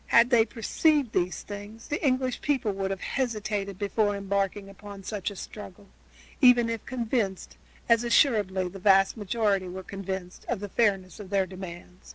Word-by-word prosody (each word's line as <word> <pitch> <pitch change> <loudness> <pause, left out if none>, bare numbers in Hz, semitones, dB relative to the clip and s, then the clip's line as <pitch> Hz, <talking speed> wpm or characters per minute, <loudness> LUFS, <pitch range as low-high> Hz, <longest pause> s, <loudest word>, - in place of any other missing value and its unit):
Had 235 +2 +5
they 230 -2 +6
perceived 265 +4 +1
these 175 -1 0
things 205 +2 -9
the 295 - -2
English 255 -2 +1
people 265 -8 0
would 195 0 -2
have 195 -1 -4
hesitated 210 -6 -2
before 205 0 0
embarking 200 0 -1
upon 195 0 -11
such 205 -1 -3
a 200 - -9
struggle, 200 0 -10 0.5
even 245 -3 +6
if 230 -2 -4
convinced, 230 -6 -2 0.3
as 230 0 +4
assuredly 210 - +3
the 195 +2 -9
great 195 0 +4
majority 205 -3 0
were 185 +1 -7
convinced, 190 -2 -6
of 240 - -1
the 205 0 -6
fairness 195 -4 0
of 200 -3 -9
their 195 -1 +2
demands. 180 -1 -10
205 Hz, 165 wpm, -27 LUFS, 195-230 Hz, 0.5 s, they